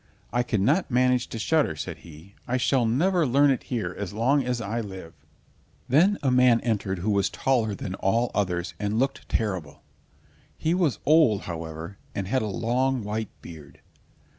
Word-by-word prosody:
"I 120 - +2
cannot 120 - +1
manage 125 -1 +2
to - - -6
shudder," 145 - +1
said 75 - -6
he. 85 +4 -14
"I 125 +1 0
shall 125 -1 +2
never 170 +9 +2
learn 140 +3 +4
it 130 - 0
here 120 -4 -2
as 105 -1 -5
long 130 +6 +2
as 125 -1 -2
I 115 +2 -3
live." 95 -6 -9 0.7
Then 180 +10 +4
a 135 - +2
man 125 -2 +5
entered 105 -5 -1
who 100 +5 -1
was 100 -1 +2
taller 115 -6 0
than 95 - -5
all 115 +6 0
others, 90 -3 -1
and 105 +1 -1
looked 135 +3 -1
terrible. 90 -10 -3 0.7
He 160 - 0
was 175 -7 +1
old, 150 -10 +4
however, 80 +2 -7 0.2
and 95 -2 -3
had 130 +6 +1
a 110 - -2
long 125 +4 0
white 105 +1 -3
beard. 75 -4 -12
115 Hz, 170 wpm, -26 LUFS, 95-130 Hz, 0.7 s, man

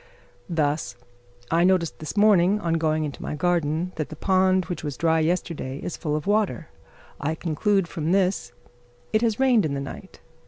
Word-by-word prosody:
Thus, 150 -5 -1 0.6
I 165 +1 +3
notice 180 -3 +3
this 155 +6 -8
morning, 205 -1 +5
on 170 -5 -1
going 155 -1 +1
into 145 -5 -5
my - - -4
garden, 170 +1 0
that 155 - -3
the 155 - -8
pond 185 +2 +2
which 175 -4 -5
was 145 -4 -4
dry 160 -1 +2
yesterday 160 -5 -2
is 170 - -5
full 150 -3 -2
of 150 - -3
water. 205 -5 0 0.5
I 155 +2 -1
conclude 180 +4 0
from 165 -1 -3
this, 180 -10 +1 0.6
"It 215 - +3
has 225 -1 0
rained 255 -5 +4
in 145 -3 -1
the - - -2
night." 140 0 -9
170 Hz, 180 wpm, -24 LUFS, 155-190 Hz, 0.6 s, morning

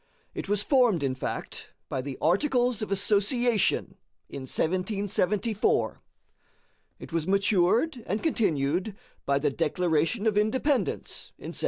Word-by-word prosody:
It - - -6
was 205 0 +3
formed, 245 - +3
in 135 -2 0
fact, 130 - -6
by 130 - -3
the 135 0 -6
Articles 245 - +2
of 215 - -4
Association 205 +3 +1 0.3
in 130 -1 -7
1774. 200 +3 0 1.0
It - - -11
was 165 0 -1
matured 200 - +2
and 210 - -2
continued 180 - 0 0.3
by 140 0 +3
the 145 0 0
Declaration 165 - 0
of 210 -2 +3
Independence 260 +6 -1
in - - -8
1776. - - -7
200 Hz, 125 wpm, -27 LUFS, 165-225 Hz, 1.0 s, was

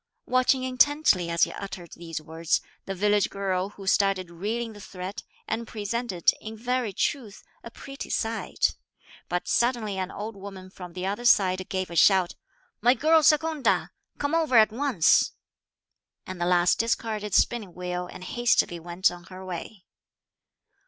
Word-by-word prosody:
Watching 255 +1 +2
intently, 255 - +3
as 170 0 +2
he - - +2
uttered 185 -3 -8
these 165 -2 -6
words, 160 +1 -1 0.3
the 195 - -4
village 205 +1 +2
girl 195 -1 -2
who 200 -1 -12
started 195 -2 +1
reeling 220 +6 -3
the 205 - -12
thread, 185 +2 -7 0.3
and 225 +1 -3
presented, 215 -4 0
in 220 0 -8
very 250 -1 -1
truth, 220 0 -2 0.2
a - - -8
pretty 275 +4 -9
sight. 225 0 -1 0.5
But 180 0 -2
suddenly 235 -5 +1
an 185 0 -2
old 215 +2 -6
woman 190 -1 -10
from 180 -2 -10
the 180 +1 -4
other 205 +5 -3
side 185 -5 +3
gave 185 -2 -2
a - - -6
shout. 185 0 +5 0.5
"My 245 +4 +5
girl 315 +5 +4
Secunda, 285 - +2 0.3
come 285 +2 -2
over 315 -7 +3
at 215 -1 +6
once;" 240 - +3 0.9
and 185 -1 -7
the 175 - +1
lass 175 -1 +4
discarded 220 -3 -1
the - - +7
spinning 210 -7 -1
wheel 180 0 -4
and 185 - -10
hastily 225 -5 +1
went 175 +3 +1
on 175 0 -11
her 185 0 -10
way. 180 +2 -7
200 Hz, 160 wpm, -26 LUFS, 180-235 Hz, 0.9 s, the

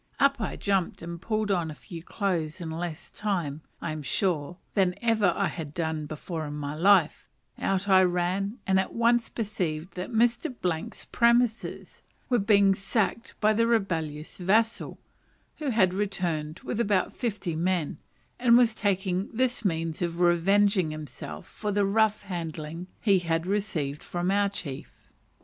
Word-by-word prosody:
Up 275 -3 +3
I - - -2
jumped, 195 -5 -1
and 170 0 -6
pulling 215 -1 -1
on 175 -4 +1
a 155 - -7
few 165 +2 -9
clothes 170 -4 -2
in 165 -2 -5
less 165 -1 -5
time, 170 -8 -2 0.2
I 165 - -2
am 155 0 -4
sure, 170 +1 -1 0.2
than 185 -3 +2
ever 220 -5 +3
I - - +2
had 155 -3 -5
done 160 -2 -2
before 155 0 -5
my 145 0 -4
in 155 - -7
life, 190 -5 +4 0.3
out 195 +1 0
I 190 -1 +6
ran, 185 +4 0
and 190 0 +3
at 190 - -2
once 235 0 +2
perceived 180 -7 -3
that 180 0 -5
Mr. 240 +5 +1 0.4
's - - -8
premises 235 -1 +1 0.3
were 245 -2 +3
being 200 -1 +5
sacked 220 +4 -1
by 215 0 +4
the 230 +2 +2
rebellious 165 -10 -1
vassal, 220 +5 +1 0.6
who 300 -3 -2
had 195 -7 +3
returned 175 -5 -2
with 230 - -4
about 205 -5 +1
fifty 200 -8 -2
men, 170 -2 0 0.4
and 240 -1 +6
was 240 -2 +5
taking 190 -2 0
this 245 0 0
means 165 -4 -1
of 170 -1 -2
revenging 185 +1 +3
himself 140 - -7
for 210 -1 -4
the 205 0 +2
rough 215 +1 +2
handling 165 -2 -5
he 200 -4 +4
had 165 -1 -1
received 180 -8 -2
from 175 +1 -2
our 200 0 +3
chief. 145 -9 -8
185 Hz, 160 wpm, -27 LUFS, 165-210 Hz, 0.6 s, I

